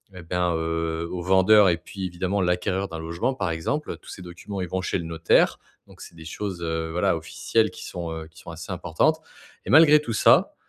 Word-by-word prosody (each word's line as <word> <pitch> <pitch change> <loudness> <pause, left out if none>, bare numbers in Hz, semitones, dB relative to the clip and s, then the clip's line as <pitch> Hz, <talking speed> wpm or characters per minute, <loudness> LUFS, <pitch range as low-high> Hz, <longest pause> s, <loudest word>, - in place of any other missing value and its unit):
et 90 - -9
ben, 90 0 0
heu, 80 0 -2
au 90 - -4
vendeur 95 +2 +5
et 85 - +1
puis 95 +2 -7
évidemment, 95 +3 -2
l'acquéreur 90 +2 0
d'un 85 - -6
logement, 85 +11 -2
par 90 -7 -2
exemple. 110 - -3
Tous - - -14
ces 95 - -9
documents, 90 +3 -8
ils 90 - -3
vont 95 0 -2
chez - - -1
le 85 - -5
notaire, 80 0 +2 0.3
donc - - -18
c'est - - -12
des 80 -1 -12
choses, 95 +2 -5
heu, 80 0 -2
voilà, 90 0 +1
officielles 110 +7 0
qui - - -10
sont, 85 -2 -5
heu, 80 -1 -7
qui 80 -1 -18
sont 85 - -12
assez 85 +4 -8
importantes 90 - +1 0.5
et - - -7
malgré 150 +1 +7
tout 120 -6 -4
ça, - - +4
90 Hz, 220 wpm, -24 LUFS, 80-95 Hz, 0.5 s, malgré